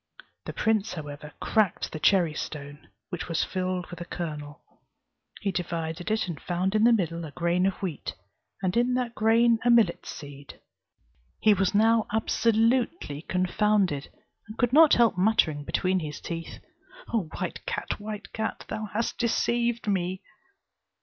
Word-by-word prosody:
The - - -5
prince 220 -2 +1
however 150 -2 -8
cracked 215 -5 +1
the 155 - -5
cherry 175 -2 +4
stone, 145 -1 -7 0.2
which 175 -4 -5
was 165 - +1
filled 185 -1 -2
with 175 -1 -8
a - - -4
kernel: 150 -3 -6 0.8
he 200 - 0
divided 170 0 -3
it, 220 -2 0
and 165 -5 -6
found 185 +2 -1
in 215 +1 +4
the 240 - +7
middle 170 -6 0
a 160 - -6
grain 175 +4 +1
of 195 - -1
wheat, 170 -7 -4 0.5
and 185 -1 0
in 245 +1 +2
that 245 -2 -1
grain 230 +1 +4
a 245 - +3
millet 230 -7 +4
seed. 140 -1 -9 0.8
He 215 - +5
was 195 0 +1
now 225 +1 +4
absolutely 225 - +1
confounded, 185 -3 +1 0.4
and 215 +2 -10
could 245 0 +1
not 315 +1 +8
help 230 -6 +3
muttering 180 -8 +3
between 185 +5 0
his 150 -3 -6
teeth: 165 -1 -6 0.6
"O 200 -9 0
white - - -4
cat, 485 - -3
white 210 0 -7
cat, 220 0 -3
thou 215 0 -3
hast 230 +2 -2
deceived 235 -1 0
me!" 185 -2 -1
190 Hz, 155 wpm, -27 LUFS, 170-225 Hz, 0.8 s, not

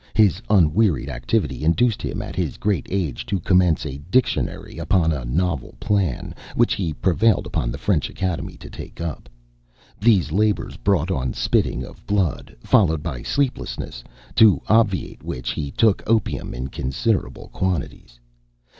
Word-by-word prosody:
His 105 -3 +4
unwearied 90 -5 +3
activity 65 - -1
induced 110 +8 +2
him, - - -3
at - - -7
his - - -2
great 100 -8 -1
age, 90 -9 -2
to 100 - -1
commence 90 -2 +3
a 70 -2 -5
"Dictionary" 130 +5 0
upon 85 -4 +2
a 65 -6 -3
novel 80 +2 -1
plan, 95 -11 -1 0.2
which - - +3
he 90 -5 -2
prevailed 95 +6 +2
upon - - -2
the - - -5
French - - 0
Academy 90 -3 -3
to - - -11
take - - -10
up. 80 -7 -5 0.7
These 100 -7 +3
labors 105 +4 +1
brought 95 -3 +1
on 65 -6 -1
spitting - - 0
of - - -13
blood, 95 -8 -1
followed 80 -7 +3
by 70 -8 -4
sleeplessness, 125 - -2 0.3
to 110 -4 +7
obviate 110 -4 +2
which 65 -1 -4
he 70 +3 -3
took 110 +7 +2
opium 110 -2 0
in 65 +2 -4
considerable 80 - -2
quantities. 80 -9 -3
90 Hz, 145 wpm, -22 LUFS, 70-105 Hz, 0.7 s, to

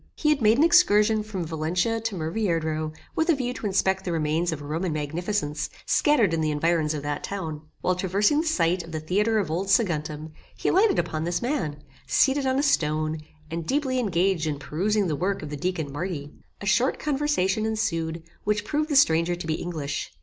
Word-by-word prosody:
He 300 - +1
had 300 -3 +2
made 220 +1 +5
an 290 - +5
excursion 220 -11 +5
from 205 -5 -4
Valencia 170 +8 -1
to 225 -2 -3
Murviedro, 160 -3 -1 0.2
with 320 +2 +1
a 330 - +5
view 250 -2 -2
to 225 - -4
inspect 190 -1 +1
the 180 - -3
remains 165 +2 0
of 150 -2 -5
Roman 160 +5 -2
magnificence, 155 0 -2 0.2
scattered 240 - +3
in 165 - 0
the 155 - +1
environs 155 0 +1
of 145 - -5
that 145 0 -3
town. 160 -7 -4 0.2
While 185 - +2
traversing 200 - +2
the 330 - -4
scite 180 - +2
of 165 0 -11
the 155 - -2
theatre 205 +8 +1
of 190 -7 -1
old 180 +4 -1
Saguntum, 155 -7 0 0.3
he - - 0
lighted 390 +1 +4
upon 155 0 -1
this 175 +1 -1
man, 155 - -2 0.2
seated 270 0 +3
on 260 0 +1
a 280 - +2
stone, 155 - +1 0.3
and 165 0 -3
deeply 265 -2 0
engaged 185 -6 +1
in 150 -2 -1
perusing 195 +8 0
the 160 -4 -1
work 185 +3 -1
of 150 - -7
the - - -3
deacon 165 -2 -2
Marti. 150 -2 -4 0.3
A - - -5
short 235 +7 +2
conversation 270 -9 0
ensued, 165 -7 -2 0.2
which 210 0 0
proved 300 +6 -1
the 290 - 0
stranger 170 - +4
to 175 - -7
be 160 - 0
English. 155 -4 -4
180 Hz, 200 wpm, -25 LUFS, 155-220 Hz, 0.3 s, made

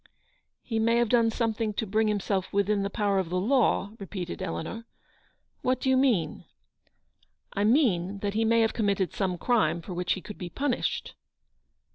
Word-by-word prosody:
ff - - -26 0.6
He 225 -2 -2
may 230 +1 +3
have 235 -1 +2
done 230 -1 +4
something 225 -2 -1
to 220 - -1
bring 215 +2 +1
him 210 -1 +1
self 190 -1 -2
within 200 +1 +1
the 200 - -1
power 200 -2 +1
of 185 -3 -2
the 180 +1 0
law," 225 -2 +2
repeated 190 -2 -6
Eleanor. 205 +5 -4 0.4
" - - -41
What 255 0 +1
do 265 - +1
you - - +4
mean? 250 - +1 0.6
" - - -44 0.3
"I 205 0 0
mean 205 - +2
that 200 0 -1
he 220 +1 +1
may 230 +1 +4
have 225 - +2
committed 200 -4 0
some 185 -3 -1
crime 225 -3 +2
for 180 +2 -8
which 180 +1 0
he 190 - -6
could 210 - -10
be 180 - -5
punished." 265 +5 -2
210 Hz, 195 wpm, -27 LUFS, 190-230 Hz, 0.6 s, done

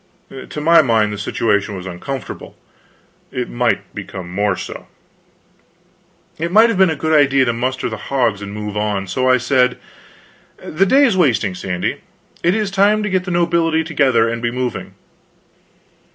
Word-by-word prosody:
To - - -6
my 165 +2 +5
mind, 110 -6 +1
the - - -5
situation 100 0 0
was 90 -1 -7
uncomfortable. 100 +7 -7 0.7
It - - -4
might - - -1
become 90 -2 -8
more 100 0 +1
so. - - -8 1.5
It 170 +2 -2
might 225 +2 +5
be 190 - +5
a 160 -3 0
good 160 +2 -1
idea 140 -3 +4
to 120 - 0
muster 130 +2 -2
the 110 -2 -5
hogs 120 -7 0
and 100 -1 -7
move 105 0 -6
on. 105 -2 -1
So 130 +8 0
I 130 - +5
said: 125 0 +1 0.8
"The 190 +5 -1
day 280 +7 +5
is 230 -7 +2
wasting, 120 - +2
Sandy. 90 -1 -3 0.4
It 175 +3 +2
is 210 -3 -1
time 205 +2 +3
to 210 - -2
get 185 -1 0
the - - -5
nobility 170 -2 +1
together 135 -8 +2
and 115 0 -3
be 120 - 0
moving." 120 -5 -4
130 Hz, 165 wpm, -18 LUFS, 105-170 Hz, 1.5 s, my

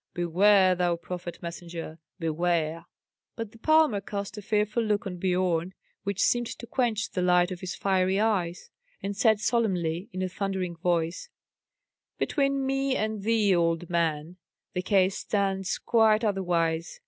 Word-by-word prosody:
Beware, 185 +2 +4
thou 175 -1 +1
prophet 175 0 -7
messenger, 170 -1 -7 0.2
beware!" 165 -1 -1 0.5
But 225 -3 -5
the 225 - -17
palmer 310 -7 +3
cast 200 +1 -5
a 210 - -7
fearful 210 +2 0
look 215 0 0
on 180 -2 -5
Biorn, 180 -1 0 0.3
which 200 +1 0
seemed 240 -1 +2
to 235 - -8
quench 230 -2 -1
the 180 - -2
light 180 0 +3
of 180 - -5
his 185 +1 -5
fiery 190 0 +1
eyes, 205 - -1 0.3
and 200 0 -3
said 220 0 +3
solemnly, 190 -7 0
in 185 +1 -3
a - - 0
thundering 185 -2 -3
voice, 170 - -1 0.9
"Between 275 -2 0
me 270 0 0
and 215 -1 -2
thee, 210 -2 +3
old 170 0 0
man, 165 0 -1 0.4
the 180 - -1
case 190 0 +2
stands 195 -2 -1
quite 220 -1 +3
otherwise. 175 -5 0
190 Hz, 150 wpm, -27 LUFS, 175-215 Hz, 0.9 s, Beware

